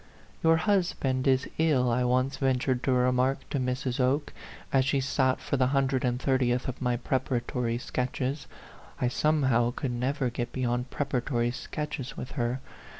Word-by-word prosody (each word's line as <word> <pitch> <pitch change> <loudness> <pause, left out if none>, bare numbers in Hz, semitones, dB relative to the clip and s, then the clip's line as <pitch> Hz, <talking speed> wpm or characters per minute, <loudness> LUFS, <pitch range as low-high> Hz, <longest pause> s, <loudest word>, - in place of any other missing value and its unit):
" - - -27
Your 165 0 +5
husband 160 -9 +1
is 130 0 +3
ill," 135 -7 +3
I 125 +2 +2
once 130 +2 +1
ventured 130 -1 +1
to 135 - +2
remark 125 +1 +2
to 140 - 0
Mrs. 125 0 -2
Oke, 135 +4 +1 0.4
as 135 -1 +5
she 135 +1 +1
sat 130 -1 +1
for 140 - -2
the 130 -1 +3
hun 135 0 +2
dred 130 -1 -1
and 125 -1 0
thirtieth 130 -2 +1
of 130 +1 -5
my 125 -1 +1
preparatory 125 -1 -1
sketches 130 +3 -3 0.5
(I 125 - +2
somehow 130 -4 +2
could 135 - -2
never 125 +1 -1
get 120 0 -3
beyond 125 0 -1
prepara 130 -4 -1
tory 120 -3 0
sketches 140 0 -5
with 125 - -6
her). 125 0 -1
130 Hz, 170 wpm, -28 LUFS, 125-135 Hz, 0.5 s, Your